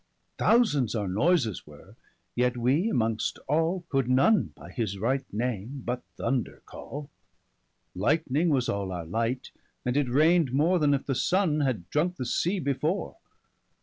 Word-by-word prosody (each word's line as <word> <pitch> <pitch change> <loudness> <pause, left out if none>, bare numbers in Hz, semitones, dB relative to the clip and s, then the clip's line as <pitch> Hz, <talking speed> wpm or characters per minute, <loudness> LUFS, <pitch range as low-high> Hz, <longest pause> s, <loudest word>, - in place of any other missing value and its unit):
40 - - +2
Thousands 145 - +2
our 105 -3 -1
noyses 110 - +1
were, 75 -1 -15 0.4
yet 125 0 +1
wee'mongst 120 - +1
all 165 +5 +1
Could 135 -3 0
none 135 +12 +3
by - - -12
his 105 -5 -3
right 130 +6 -1
name, 120 +3 -3
but 125 +1 -2 0.2
thunder 130 -4 -2
call: 145 0 -8 0.9
Lightning 150 - +1
was 130 -5 +1
all 100 -2 -2
our 85 -2 -5
light, 115 +8 -2 0.3
and 125 +1 0
it 145 -3 +1
rain'd 155 +2 +4
more 165 +6 +3
Then 145 -2 +3
if 135 - -4
the 135 - -1
Sunne 175 +2 +1
had 125 - -1
drunke 175 +5 +1
the 130 - -4
sea 175 +10 0
before. 155 - -2
135 Hz, 150 wpm, -27 LUFS, 115-155 Hz, 0.9 s, rain'd